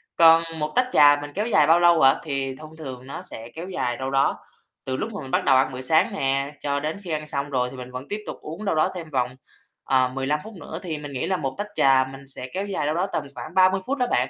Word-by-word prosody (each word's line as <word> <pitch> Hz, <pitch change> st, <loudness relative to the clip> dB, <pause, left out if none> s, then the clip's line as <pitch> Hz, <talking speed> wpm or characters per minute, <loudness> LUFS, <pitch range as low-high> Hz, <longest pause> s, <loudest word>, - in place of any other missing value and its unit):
Còn 165 Hz, 0 st, +7 dB, 0.2 s
một 150 Hz, 0 st, -2 dB
tách 250 Hz, -, +3 dB
trà 145 Hz, -, +7 dB
mình 145 Hz, 0 st, -7 dB
kéo 210 Hz, +3 st, -1 dB
dài 155 Hz, -10 st, +4 dB
bao 165 Hz, +2 st, +6 dB
lâu 170 Hz, -2 st, +5 dB
hả? 135 Hz, +1 st, +6 dB
Thì 135 Hz, -3 st, -3 dB
thông 155 Hz, +3 st, -12 dB
thường 130 Hz, -4 st, -8 dB
nó 140 Hz, -, -6 dB
sẽ 115 Hz, -11 st, -5 dB
kéo 170 Hz, +3 st, -6 dB
dài 125 Hz, -9 st, -2 dB
đâu 130 Hz, 0 st, -3 dB
đó 135 Hz, 0 st, +2 dB, 0.5 s
từ 130 Hz, 0 st, -2 dB
lúc 220 Hz, +8 st, -4 dB
mà 205 Hz, -, -5 dB
mình 130 Hz, -, -8 dB
bắt -, -, +2 dB
đầu 135 Hz, -, +5 dB
ăn 130 Hz, -, +2 dB
bữa 130 Hz, -, -5 dB
sáng 155 Hz, +5 st, +2 dB
nè, 135 Hz, +1 st, 0 dB
cho 140 Hz, -1 st, -1 dB
đến 155 Hz, +4 st, -3 dB
khi 175 Hz, -, -6 dB
ăn 155 Hz, -1 st, -2 dB
xong 140 Hz, -1 st, -2 dB
rồi 125 Hz, -3 st, 0 dB
thì 130 Hz, -, -10 dB
mình 125 Hz, 0 st, -8 dB
vẫn 125 Hz, +2 st, -7 dB
tiếp 210 Hz, -, -3 dB
tục -, -, -5 dB
uống 165 Hz, +8 st, -7 dB
đâu 195 Hz, -, +1 dB
đó 155 Hz, -, +2 dB
thêm 165 Hz, -3 st, -7 dB
vòng, 125 Hz, -3 st, -1 dB, 0.5 s
ờ, 130 Hz, -1 st, +3 dB
15 135 Hz, +3 st, -1 dB
phút 220 Hz, -, -10 dB
nữa, 165 Hz, -3 st, -8 dB
thì 165 Hz, -4 st, -3 dB
mình 145 Hz, -1 st, -8 dB
nghĩ 135 Hz, +5 st, -2 dB
là 190 Hz, 0 st, +1 dB
một 135 Hz, -4 st, -3 dB
tách 205 Hz, +1 st, -3 dB
trà 135 Hz, -1 st, +4 dB
mình 135 Hz, +1 st, -12 dB
sẽ 130 Hz, -1 st, -6 dB
kéo 195 Hz, +2 st, -2 dB
dài 190 Hz, -7 st, -2 dB
đâu 150 Hz, +2 st, 0 dB
đó 180 Hz, +3 st, 0 dB
tầm 155 Hz, -, 0 dB
khoảng 125 Hz, +7 st, -8 dB
30 190 Hz, 0 st, +4 dB
phút 275 Hz, +2 st, -1 dB
đó 250 Hz, -2 st, +1 dB
bạn. -, -, +2 dB
150 Hz, 285 wpm, -24 LUFS, 135-170 Hz, 0.5 s, Còn